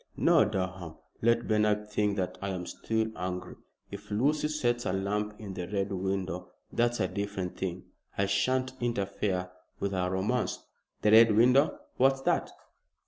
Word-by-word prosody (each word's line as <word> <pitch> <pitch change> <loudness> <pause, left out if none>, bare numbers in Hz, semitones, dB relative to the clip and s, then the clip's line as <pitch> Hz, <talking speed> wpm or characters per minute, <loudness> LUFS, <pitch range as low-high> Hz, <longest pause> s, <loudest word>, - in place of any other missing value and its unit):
No, - - +5
Durham, 95 -4 -3 0.3
let 115 +1 +2
Bernard 105 -1 +2
think 105 -1 +1
that 90 -2 -2
I 100 - -2
am 90 -2 -3
still 110 +4 -2
angry. 90 0 -4 0.4
If 100 +1 -9
Lucy 145 +9 +1
sets 120 -6 0
a - - +1
lamp 105 +2 -1
in 100 -3 -7
the 90 -1 -5
Red 100 0 -2
Window 95 -2 -3 0.2
that's 120 0 +1
a 95 - +2
different 100 -2 -4
thing. 90 -1 -4 0.3
I 100 - +2
shan't 130 +6 +1
interfere 100 -5 -1 0.3
with 100 - -1
her 90 -1 0
romance." 100 +7 0 0.5
"The 105 - +4
Red 110 -1 +7
Window. 125 +6 +5 0.2
What's 135 +1 +3
that?" - - +1
100 Hz, 155 wpm, -29 LUFS, 95-115 Hz, 0.5 s, Red